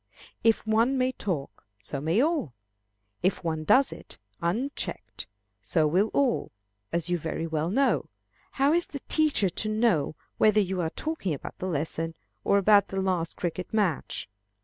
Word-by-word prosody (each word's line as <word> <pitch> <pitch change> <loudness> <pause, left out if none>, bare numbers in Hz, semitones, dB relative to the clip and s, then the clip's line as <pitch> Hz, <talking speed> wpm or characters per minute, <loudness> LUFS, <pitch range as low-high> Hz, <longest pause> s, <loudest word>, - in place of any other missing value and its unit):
If 225 -1 +3
one 230 +5 +3
may 255 0 +2
talk, 175 - -4 0.2
so 105 +6 -5
may 165 - +2
all; 290 - 0 0.7
if 185 +1 0
one 160 -2 -1
does 260 - +4
it, - - -10 0.2
unchecked, 225 +12 -3 0.3
so 160 -3 +1
will 180 +8 +3
all, 270 -4 +1 0.4
as 170 +1 -1
you 175 - +1
very 160 +1 -3
well 160 0 -1
know. 270 +8 +2 0.5
How 280 +2 +3
is 345 +1 +1
the 280 -3 -7
teacher 305 -10 +2
to 215 +5 -3
know 215 -9 +2 0.2
whether 215 0 +5
you 190 -2 0
are 160 - 0
talking 250 - -3
about - - -9
the 185 - -3
lesson, 165 0 -2 0.3
or 200 - +4
about 200 0 +5
the 195 - -3
last 180 -4 -1
cricket 175 +1 -3
match? 190 - 0
190 Hz, 160 wpm, -27 LUFS, 165-235 Hz, 0.7 s, whether